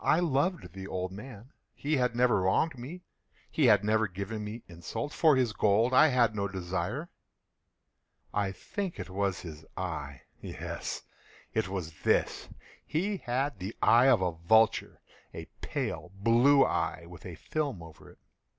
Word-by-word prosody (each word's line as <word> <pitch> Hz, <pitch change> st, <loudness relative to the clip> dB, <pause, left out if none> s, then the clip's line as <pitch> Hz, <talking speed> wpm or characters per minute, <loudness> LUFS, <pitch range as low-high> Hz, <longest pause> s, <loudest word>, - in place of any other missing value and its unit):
I 160 Hz, -, +4 dB
loved 165 Hz, -, 0 dB
the 95 Hz, 0 st, -7 dB
old 95 Hz, -1 st, -3 dB
man. 115 Hz, +4 st, -10 dB, 0.2 s
He 150 Hz, +1 st, 0 dB
had 125 Hz, -2 st, +1 dB
never 120 Hz, -5 st, +3 dB
wronged 95 Hz, -, +2 dB
me. 145 Hz, +9 st, -8 dB, 0.5 s
He 150 Hz, -5 st, +3 dB
had 105 Hz, -3 st, +5 dB
never 110 Hz, +1 st, +2 dB
given 100 Hz, +3 st, -5 dB
me 110 Hz, +3 st, -6 dB
insult. 90 Hz, -, -5 dB
For 155 Hz, -3 st, +5 dB
his 125 Hz, -4 st, +1 dB
gold 110 Hz, +4 st, +3 dB
I 155 Hz, -, +7 dB
had 120 Hz, -6 st, +3 dB
no 100 Hz, -1 st, 0 dB
desire. 95 Hz, -, -3 dB, 1.2 s
I 100 Hz, -2 st, 0 dB
think 190 Hz, -, -5 dB
it -, -, -6 dB
was 95 Hz, -1 st, -1 dB
his 80 Hz, -3 st, -9 dB
eye! 75 Hz, -7 st, -4 dB, 0.2 s
yes, -, -, -5 dB, 0.5 s
it -, -, 0 dB
was 85 Hz, -5 st, -5 dB
this! -, -, +1 dB, 0.3 s
He 195 Hz, +6 st, -1 dB
had 130 Hz, -, -2 dB
the 95 Hz, +4 st, -5 dB
eye 120 Hz, +3 st, +6 dB
of 125 Hz, -7 st, +5 dB
a 90 Hz, -, +1 dB
vulture—a 110 Hz, +7 st, 0 dB, 0.2 s
pale 90 Hz, -, -3 dB
blue 120 Hz, +7 st, +5 dB
eye, 85 Hz, +1 st, -1 dB
with 85 Hz, -3 st, -12 dB
a 90 Hz, -3 st, -7 dB
film 140 Hz, -, -3 dB
over 80 Hz, -1 st, -13 dB
it. -, -, -18 dB
110 Hz, 155 wpm, -30 LUFS, 95-130 Hz, 1.2 s, I